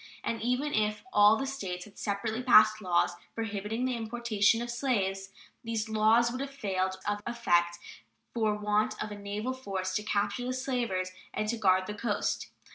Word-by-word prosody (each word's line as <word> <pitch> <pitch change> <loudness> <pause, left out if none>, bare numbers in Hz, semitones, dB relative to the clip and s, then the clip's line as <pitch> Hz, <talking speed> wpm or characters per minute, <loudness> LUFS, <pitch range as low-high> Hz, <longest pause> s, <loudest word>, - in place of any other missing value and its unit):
And 230 -2 -2
even 250 +5 0
if 210 -1 0
all 210 +1 +7
the 270 - -2
States 190 -10 -4
had 205 - -16
separately 215 +3 -2
passed 215 -3 +6
laws 180 -3 +2 0.2
prohibiting 225 +2 -2
the 255 -1 0
importation 225 -2 +1
of 240 0 -3
slaves, 195 -7 -1 0.3
these 225 -1 -2
laws 220 +2 +4
would 255 +2 -4
have 275 - -3
failed 190 -8 -2
of 205 0 -1
effect 175 -8 +2 0.6
for 220 -3 +1
want 210 +1 +1
of 210 - -6
a - - -5
naval 205 +5 -3
force 195 -7 -4
to 210 - 0
capture 210 +3 -1
the 255 - -1
slavers 240 -8 -1 0.2
and 215 - -1
to 235 - 0
guard 185 -3 +3
the 210 - -5
coast. 210 0 -2
215 Hz, 175 wpm, -30 LUFS, 200-235 Hz, 0.6 s, all